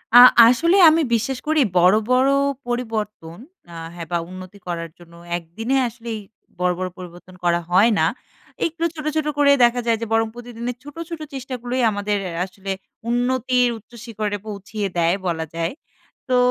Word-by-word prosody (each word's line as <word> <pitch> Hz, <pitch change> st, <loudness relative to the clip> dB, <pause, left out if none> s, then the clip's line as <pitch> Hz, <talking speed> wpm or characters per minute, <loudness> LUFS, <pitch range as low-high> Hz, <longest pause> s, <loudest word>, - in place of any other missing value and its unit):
আ -, -, +11 dB, 0.3 s
আসলে 335 Hz, +10 st, +3 dB
আমি 325 Hz, +1 st, +3 dB
বিশ্বাস 250 Hz, +3 st, 0 dB
করি 310 Hz, -1 st, +3 dB, 0.2 s
বড়, 180 Hz, +3 st, +6 dB, 0.2 s
বড় 260 Hz, +2 st, +4 dB, 0.4 s
পরিবর্তন 215 Hz, -8 st, -4 dB, 0.4 s
আ -, -, -9 dB, 0.2 s
হ্যাঁ 170 Hz, -1 st, -7 dB
বা 175 Hz, -, +2 dB
উন্নতি 185 Hz, +1 st, -10 dB
করার 165 Hz, -1 st, -4 dB
জন্য 170 Hz, -1 st, -16 dB, 0.2 s
একদিনে 220 Hz, +10 st, -3 dB
আসলেই 230 Hz, -1 st, -6 dB, 0.4 s
বড়, 180 Hz, 0 st, +2 dB
বড় 185 Hz, -, -2 dB
পরিবর্তন 180 Hz, 0 st, -11 dB
করা 175 Hz, 0 st, +2 dB
হয় 205 Hz, +6 st, +5 dB
না। 160 Hz, -, +4 dB, 0.6 s
একটু 335 Hz, 0 st, -3 dB
ছো্ট, 305 Hz, -2 st, -8 dB
ছোট 310 Hz, -1 st, 0 dB
করে 285 Hz, -1 st, +5 dB
দেখা 245 Hz, +1 st, +1 dB
যায় 230 Hz, -1 st, +3 dB
যে -, -, -1 dB
বরং 225 Hz, 0 st, +3 dB
প্রতিদিনের 240 Hz, 0 st, -6 dB
ছোট, 290 Hz, 0 st, -11 dB
ছোট 335 Hz, -2 st, -5 dB
চেষ্টা 265 Hz, -1 st, -5 dB
গুলোই 250 Hz, +1 st, -2 dB
আমাদের 205 Hz, 0 st, -1 dB, 0.3 s
আসলে 195 Hz, +1 st, -7 dB, 0.4 s
উন্নতির 250 Hz, 0 st, +2 dB
উচ্চ 220 Hz, +3 st, -19 dB
শিখরে 215 Hz, -3 st, -3 dB
পৌঁছিয়ে 205 Hz, 0 st, -4 dB
দেয় 170 Hz, +2 st, +3 dB
বলা 160 Hz, -2 st, -1 dB
যায়। 165 Hz, 0 st, -2 dB, 0.6 s
তো 255 Hz, -, +3 dB
225 Hz, 165 wpm, -21 LUFS, 185-250 Hz, 0.6 s, আ